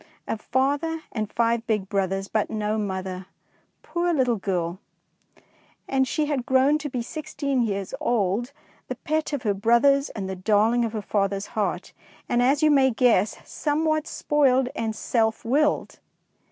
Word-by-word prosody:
A - - -1
father 285 +8 -1
and 215 -3 -3
five 235 0 0
big 210 -4 0
brothers, 195 0 -1
but 215 0 -1
no 215 0 -1
mother, 190 -2 -4 0.6
poor 345 0 -1
little 255 -7 +2
girl! 180 -2 -2 1.1
and 265 -1 +1
she 305 +2 0
had 290 -4 -1
grown 265 +4 +3
to 295 -1 -4
be 250 -2 -3
sixteen 285 -1 -2
years 200 -4 -2
old, 230 +2 0 0.4
the - - -4
pet 310 -1 -2
of 285 -4 -3
her 210 -3 +1
brothers 235 +7 +3
and 195 -3 -5
the 190 - -4
darling 215 +5 +2
of 230 -1 -2
her 215 -2 -3
father's 200 0 -1
heart, 190 -4 -2 0.3
and, 240 - +1
as 275 +5 +3
you 305 - +5
may 270 -2 +5
guess, 225 -4 +2
somewhat 310 +1 0
spoiled 265 -3 +2
and 220 -1 -2
self 220 0 0
willed. 295 +6 +1
235 Hz, 155 wpm, -25 LUFS, 205-280 Hz, 1.1 s, you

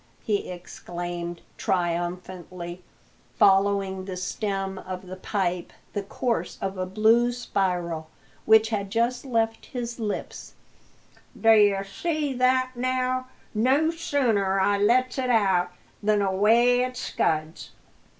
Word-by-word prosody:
he 210 -2 -1
exclaimed, 175 -1 -6 0.2
triumphantly 175 0 -3 0.5
following 195 -1 +3
with 185 - -7
the 185 -1 -5
stem 195 0 -3
of 185 0 -7
the 185 +1 -7
pipe 185 -2 -2 0.2
the 205 - -1
course 230 +4 -2
of 195 0 -3
a 185 -1 -3
blue 220 +5 +3
spiral 180 -9 -2 0.4
which 220 0 +6
had 200 -3 -2
just 235 +4 0
left 225 -3 -1
his 240 -1 -5
lips, 210 -3 -5 0.8
"d'ye 210 -3 +5
see 300 +7 -2
that, 255 0 +2
now? 255 +1 -1 0.3
No 265 +9 +3
sooner 230 - +1
I 200 +1 +2
lets 250 +5 +2
it 255 -1 -1
out 190 -6 +3 0.3
than 210 -1 +2
away 225 +6 +4
it 255 0 -1
scuds!" 155 -8 -1
205 Hz, 120 wpm, -26 LUFS, 185-240 Hz, 0.8 s, which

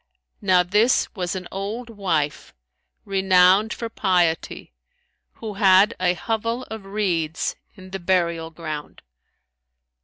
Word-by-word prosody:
Now 185 -3 +4
this 210 +7 +2
was 180 -2 -3
an 185 -1 -6
old 215 +5 -5
wife, 170 -9 -2 0.5
renowned 190 +2 +4
for 230 - -4
piety, 180 - 0 0.6
who 220 -2 -7
had 195 +1 +5
a 180 -1 +2
hovel 230 +5 -2
of 220 -3 -7
reeds 175 -6 -1 0.2
in 185 -2 -13
the 195 - -4
burial 170 -2 0
ground. 155 -2 -7
190 Hz, 115 wpm, -23 LUFS, 175-210 Hz, 0.6 s, had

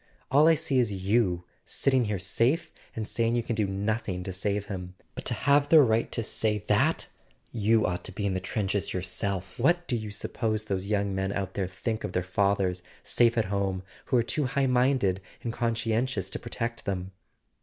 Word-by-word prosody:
All 145 +4 +6
I 165 - +6
see 135 -3 0
is 120 -4 +2
you, 95 -2 +1 0.2
sitting 130 -3 +1
here 105 -1 -1
safe 115 - 0 0.2
and 110 -1 -3
saying 115 0 +1
you 120 - +1
can 115 - -2
do 105 -3 +1
nothing 100 -1 -2
to 95 - -4
save 100 +2 -1
him! 90 -3 -6 0.2
But - - -7
to 120 - +1
have 145 +5 +3
the 160 - +8
right 115 -5 +3
to 115 - -2
say 105 0 +1
that - - +2 0.4
you 110 0 +3
ought 90 -1 -2
to - - -3
be 100 +2 -3
in 100 - +1
the 95 - 0
trenches 100 +1 -1
yourself! 95 +1 -3
What 175 +7 +2
do 125 - 0
you 110 -2 -4
suppose 110 +1 -2
those 100 -2 -2
young 100 -1 0
men 95 0 -1
out 95 -2 -3
there 95 -2 -1
think 110 +4 -3
of 90 - -4
their 90 - 0
fathers, 95 -1 +1 0.2
safe 120 -1 +3
at 110 - +3
home, 95 -2 -1 0.2
who 130 - +2
are 120 - +3
too 145 +5 0
high 135 +2 +1
minded 125 -7 +2 0.2
and 115 - -2
conscientious 115 -3 -1
to - - -4
protect 115 0 -4
them?" 95 -1 -3
105 Hz, 200 wpm, -28 LUFS, 95-120 Hz, 0.4 s, the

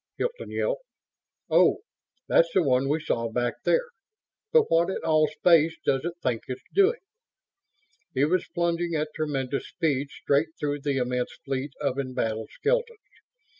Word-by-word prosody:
Hilton 485 0 -3
yelped. - - -1 0.7
"Oh - - +4 0.5
that's 165 - +4
the 185 - +5
one 135 -1 +2
we 155 +2 +1
saw 115 -6 -1
back 120 +1 -2
there. 485 0 +2 0.6
But 470 -1 +6
what 170 - +2
in 190 - -2
all 155 -1 +3
space 160 +1 +3
does 135 -1 +1
it 170 - -2
think 120 -3 0
it's 130 0 -6
doing?" 400 +4 +3 1.1
It 135 +2 +3
was 180 +3 +1
plunging 170 0 0
at 150 0 -1
tremendous 140 -3 -2
speed 145 -5 -1
straight 150 +4 0
through 145 -1 -2
the 140 -1 -1
immense 125 -1 -1
fleet 135 +1 -3
of 140 -2 -1
embattled 110 -4 -2
skeletons. 470 0 -1
150 Hz, 150 wpm, -26 LUFS, 130-170 Hz, 1.1 s, But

